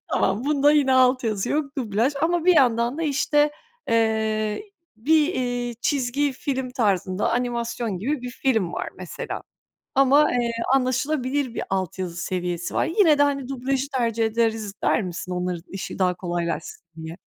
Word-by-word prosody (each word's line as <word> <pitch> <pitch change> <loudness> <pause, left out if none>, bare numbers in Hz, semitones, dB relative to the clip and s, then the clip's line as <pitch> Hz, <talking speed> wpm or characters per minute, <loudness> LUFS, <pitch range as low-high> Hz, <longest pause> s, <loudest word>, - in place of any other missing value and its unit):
Tamam, 200 +6 +1
bunda 290 0 +4
yine 285 -3 +3
alt 255 -1 +4
yazı 210 -3 -1
yok, 290 -2 -1
dublaj 230 +3 0
ama 340 0 +1
bir 360 -2 +5
yandan 240 +1 +3
da 330 - -2
işte, 295 0 +2 0.4
eee, 220 - 0 0.3
bir, 305 +7 +2
eee, 245 -1 -2
çizgi 280 0 0
film 260 -1 -3
tarzında 200 -6 0
animasyon 235 -3 -2
gibi 270 +8 -2
bir 250 - -5
film 225 -9 0
var - - -3
mesela - - -6 0.5
ama, 275 +2 +5
eee, 240 -1 0 0.2
anlaşılabilir 260 0 0
bir - - -3
alt 190 -2 -2
yazı 180 -2 -4
seviyesi 175 -1 -3
var. - - +2
Yine 330 -4 +4
de, - - +5
hani, 275 -3 0
dublajı 270 +1 -1
tercih 230 -2 +1
ederiz 220 -2 0
der - - +2
misin, 180 0 -5
onların 180 -1 -2
işi 195 - -6
daha 180 -1 +2
kolaylaşsın 175 -1 -4 0.2
diye? 160 +1 -7
245 Hz, 155 wpm, -24 LUFS, 205-275 Hz, 0.5 s, bir